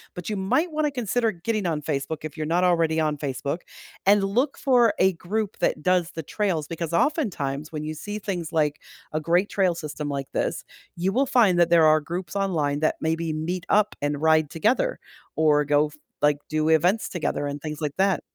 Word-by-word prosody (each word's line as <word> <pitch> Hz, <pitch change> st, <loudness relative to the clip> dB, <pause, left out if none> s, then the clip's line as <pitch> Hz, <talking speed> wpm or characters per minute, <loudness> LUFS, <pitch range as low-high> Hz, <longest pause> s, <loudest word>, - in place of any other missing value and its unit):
but 180 Hz, -1 st, -7 dB
you 215 Hz, -, -1 dB
might 255 Hz, -, 0 dB
want 310 Hz, 0 st, 0 dB
to 295 Hz, -, 0 dB
consider 245 Hz, -2 st, 0 dB
getting 205 Hz, +2 st, -2 dB
on 155 Hz, -3 st, -2 dB
Facebook 150 Hz, +1 st, -2 dB
if 155 Hz, -2 st, -6 dB
you're 155 Hz, -1 st, -3 dB
not 175 Hz, +3 st, +2 dB
already 165 Hz, -3 st, +2 dB
on 155 Hz, -1 st, +1 dB
Facebook, 140 Hz, +2 st, -3 dB, 0.5 s
and 200 Hz, 0 st, +5 dB
look 245 Hz, +9 st, 0 dB
for 240 Hz, -5 st, +4 dB
a 190 Hz, 0 st, +3 dB
group 205 Hz, +4 st, -3 dB
that 150 Hz, -, 0 dB
does 180 Hz, -2 st, +2 dB
the 160 Hz, -, -4 dB
trails, 170 Hz, -4 st, -1 dB
because 165 Hz, 0 st, -4 dB
oftentimes, 170 Hz, -, 0 dB
when 155 Hz, -1 st, -4 dB
you 155 Hz, 0 st, -4 dB
see 205 Hz, +7 st, -6 dB
things 180 Hz, -6 st, -4 dB
like 150 Hz, -3 st, +1 dB, 0.3 s
a 155 Hz, -, 0 dB
great 175 Hz, +6 st, +1 dB
trail 185 Hz, -3 st, +1 dB
system 150 Hz, -2 st, -5 dB
like 140 Hz, -1 st, -3 dB
this, -, -, -1 dB, 0.3 s
you 180 Hz, +3 st, 0 dB
will 270 Hz, +4 st, +2 dB
find 220 Hz, -9 st, +4 dB
that 170 Hz, -1 st, +4 dB
there 170 Hz, -2 st, +6 dB
are 155 Hz, 0 st, +5 dB
groups 175 Hz, +6 st, -6 dB
online 160 Hz, -8 st, 0 dB
that 155 Hz, -, +1 dB
maybe 160 Hz, 0 st, -1 dB
meet 170 Hz, +4 st, -3 dB
up 210 Hz, 0 st, +3 dB
and 145 Hz, 0 st, -1 dB
ride 155 Hz, -1 st, +3 dB
together, 245 Hz, -, 0 dB, 0.4 s
or 150 Hz, -2 st, +3 dB
go, 145 Hz, +1 st, +3 dB
f 150 Hz, -, -15 dB, 0.3 s
like, 145 Hz, -1 st, +4 dB
do 155 Hz, 0 st, 0 dB
events 180 Hz, +7 st, +3 dB
together 160 Hz, -4 st, -2 dB
and 145 Hz, 0 st, -4 dB
things 150 Hz, -1 st, -5 dB
like 150 Hz, -2 st, -2 dB
that. 195 Hz, -1 st, +2 dB
170 Hz, 205 wpm, -25 LUFS, 155-200 Hz, 0.5 s, there